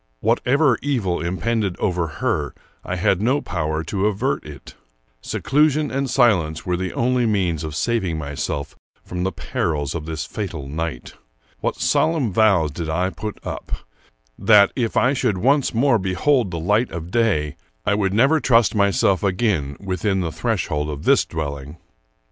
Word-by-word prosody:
Whatever 135 - +2
evil 115 -11 -1
impended 100 +2 -1
over 90 -2 0
her, 75 - -2 0.3
I 90 - -3
had 90 +1 +1
no 130 +6 +2
power 80 - -2
to 100 +5 -1
avert 105 +7 -1
it. 75 -3 -11 0.5
Seclusion 150 - +1
and 135 0 -1
silence 100 - +2
were 90 - 0
the 95 0 -3
only 125 0 +1
means 90 -7 0
of 75 -1 -5
saving 95 -2 0
myself 70 -1 -4 0.3
from 90 0 -5
the 95 +1 0
perils 75 -7 -2
of 80 -2 -5
this 80 -1 -4
fatal 85 -10 -5
night. 75 -3 -5 0.5
What - - -1
solemn 150 - +1
vows 95 -8 +3
did 80 +2 -5
I 90 +4 0
put 105 +1 -6
up, - - -5 0.7
that, 105 -3 +6
if 120 -4 -1
I 125 +2 +4
should 125 -7 0
once 135 +7 +2
more 120 0 +3
behold 95 +6 +1
the 85 - -4
light 105 +8 +1
of 85 +1 -7
day, 95 -11 +1 0.3
I 105 - +2
would 100 -2 +1
never 135 +10 +4
trust 120 -4 +3
myself 100 -2 +2
again 90 -8 0
within 95 0 -1
the 85 -2 -2
threshold 75 -1 -1
of 75 -1 -6
this - - +4
dwelling! 70 -1 -5
95 Hz, 160 wpm, -21 LUFS, 80-115 Hz, 0.7 s, that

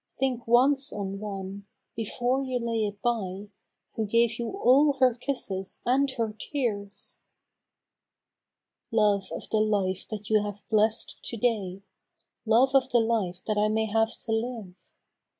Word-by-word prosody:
Think 255 -3 -1
once 270 +4 +4
on 195 -1 -4
one, 200 -1 -6 0.3
before 245 +4 -1
you 260 -2 -2
lay 230 -2 -1
it 205 0 -8
by, 205 -4 -2 0.5
Who 220 -1 -1
gave 230 +1 +2
you 235 - -2
all 290 -5 +4
her 260 -2 +3
kisses 225 -7 -3
and 275 +3 +3
her 225 -2 -1
tears! 205 -8 -4 1.7
13 225 - -3
Love 200 -3 +2
of - - -6
the 220 - +2
life 195 -3 0
that 210 -2 -6
you 215 0 +3
have 205 -1 -6
bless'd 220 +1 +1
to 235 - -4
day! 200 -5 -1 0.6
Love 245 +5 +4
of 265 -1 +4
the 245 -2 +4
life 215 -6 -1
that 215 -1 0
I 210 - +3
may 220 +1 +1
have 225 +1 0
to 225 - -3
live 225 -4 -3
220 Hz, 150 wpm, -27 LUFS, 205-245 Hz, 1.7 s, once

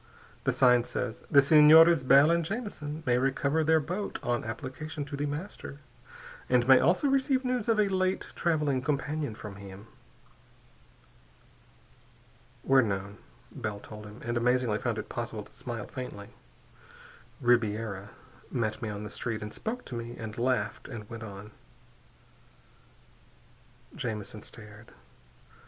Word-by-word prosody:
The - - +3
sign 125 -2 +5
says, 120 -1 -4
'_The 140 -3 +7
Senores 155 +2 +8
Bell 140 +4 +6
and 170 0 +2
Jamison 160 -7 -5
may 125 -2 +3
recover 140 +4 +1
their 160 +1 +4
boat 180 +7 -4
on 120 0 0
application 130 +6 -5
to 145 - -6
The 145 +1 -2
Master, 145 0 -6 0.7
and 125 -1 +3
may 130 -1 +8
also 185 - +3
receive 270 -1 +2
news 250 -3 -1
of 225 -2 +3
a 210 - +4
late 185 -1 0
traveling 150 -6 0
companion 145 -2 -2
from 105 -2 -9
him._" 100 0 -10 2.8
"We're 135 0 +5
known," 100 -2 -3 0.3
Bell 110 -6 -5
told 105 0 -10
him 105 +3 -12
and 120 0 -1
amazingly 120 -2 +2
found - - -2
it - - -5
possible - - -5
to - - -18
smile - - -6
faintly 105 -5 -7 1.1
"Ribiera 110 -4 +1 0.4
met 110 0 -2
me 110 - -3
on 105 0 -5
the 105 - -6
street 115 -2 -4
and 105 - -7
spoke 245 +3 -5
to - - -9
me 120 +1 -6
and 110 -2 -6
laughed 120 -3 -1
and 110 -6 -8
went 115 -1 -7
on." 105 -1 -9 2.4
Jamison 110 -2 -5
stared. 105 0 -14
125 Hz, 140 wpm, -29 LUFS, 110-155 Hz, 2.8 s, Senores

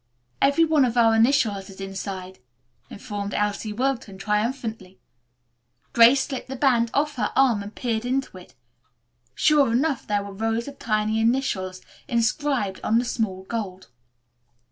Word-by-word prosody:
"Every 280 +4 +4
one 310 -3 +3
of 245 -1 0
our 225 -1 +5
initials 225 -5 +2
is 195 - -13
inside," 195 -1 -6 0.5
informed 205 0 -5
Elsie 210 +1 -1
Wilton 235 -4 -2
triumphantly. 210 -2 -3 0.9
Grace 245 +4 +6
slipped 265 -3 -6
the 265 - -4
band 245 -4 +2
off 290 +1 0
her 210 -3 -1
arm 250 -6 +3
and 205 +1 -9
peered 230 -3 -2
into 255 -6 -2
it. 180 - -17 0.8
Sure 295 -5 +4
enough 270 +3 0
there 205 -1 0
were 200 0 -8
rows 225 +4 -2
of 280 -1 -9
tiny 215 0 0
initials 215 -6 0 0.3
inscribed 235 -3 0
on 225 - +2
the 240 - +1
smooth 190 -6 -3
gold. 190 -5 -5
225 Hz, 145 wpm, -24 LUFS, 200-260 Hz, 0.9 s, Grace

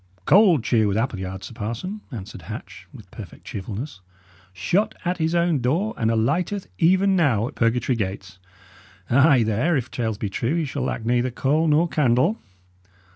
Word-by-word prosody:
"Cold 185 - +5
cheer 110 -3 +2
with 100 0 0
Appleyard, 95 -5 -3
sir 110 - -8
parson," 120 - -5
answered 105 -5 -8
Hatch, 80 - -9
with - - -14
perfect - - -11
cheerfulness. 105 +3 -6 0.5
"Shot 190 - 0
at 180 +1 -1
his 160 +1 0
own 170 -3 +2
door, 160 - 0
and 110 - 0
alighteth 155 - 0
even 190 +3 +4
now 125 - +2
at - - -8
purgatory 120 +2 +1
gates. 95 -3 -5 0.7
Ay! 135 -1 +5
there, 115 +10 +1
if 130 -2 -4
tales 110 -3 -2
be 105 - -3
true, 115 +9 -1
he 165 -2 0
shall 140 0 -4
lack 120 -3 -3
neither 120 +2 +1
coal 145 +6 +1
nor 155 +3 +3
candle." 150 - +2
125 Hz, 165 wpm, -23 LUFS, 110-165 Hz, 0.7 s, Cold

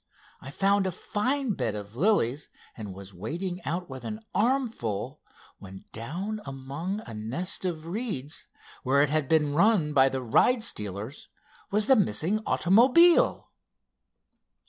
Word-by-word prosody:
I 135 - -9
found 195 +5 +2
a - - -1
fine 250 - -1
bed 120 - -2
of 105 0 -8
the 120 - -10
lilies, 150 - +1 0.3
and 105 -3 -7
was 100 0 -11
wading 175 - -5
out 180 +2 -3
with 130 -1 -9
an 215 0 -6
armful, 190 - -1 0.4
when 95 0 -11
down 185 - -5
among 140 +9 -5
a 115 - -10
nest 130 - -2
of 165 -3 -3
reeds, 170 - -4 0.3
where 140 +2 +3
it 145 - 0
had 155 -3 0
been 150 -3 +2
run 170 -3 +3
by 135 -1 +5
the 130 -1 -4
ride 225 - +3
stealers 105 - -4 0.4
was 210 +1 +2
the 265 - +5
missing 195 - +1
automobile." 255 - +4
160 Hz, 145 wpm, -27 LUFS, 130-205 Hz, 0.4 s, by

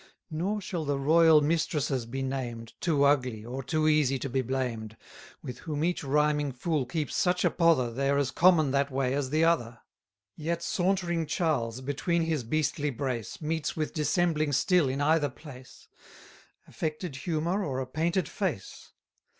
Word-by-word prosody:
60 - - -5
Nor 200 +6 -1
shall 175 -3 -4
the 145 -1 -1
royal 160 +2 +5
mistresses 145 -5 0
be 135 +3 -4
named, 120 -4 -4
Too 155 -5 +2
ugly, 130 -6 +1
or 130 +3 -5
too 155 +4 0
easy 150 -3 +3
to 135 +2 -4
be 130 - +1
blamed, 115 -4 -3 0.5
With 125 -1 -7
whom 150 -1 -3
each 175 -1 0
rhyming 150 0 +1
fool 140 +1 -1
keeps 150 +3 -3
such 180 0 +1
a - - +3
pother, 160 -9 +3
They 135 +3 0
are 140 - +2
as 140 -2 0
common 165 -5 +4
that 140 +1 +1
way 130 -1 0
as 140 -2 -1
the 155 +3 +2
other: 120 -8 +1 0.6
Yet 170 +2 -3
sauntering 175 -4 0
Charles, 130 -8 -1
between 155 +5 -1
his 160 -5 -1
beastly 150 +3 -1
brace, 130 0 -4
Meets 160 0 -2
with 155 -1 -2
dissembling 155 -1 +1
still 175 0 +3
in 135 +2 -2
either 150 0 +3
place, 130 -1 -13 0.8
Affected 155 -2 -4
humour, 170 +7 -1
or 135 -6 -2
a 130 - -2
painted 165 +5 -1
face. - - -4
150 Hz, 165 wpm, -28 LUFS, 130-165 Hz, 0.8 s, royal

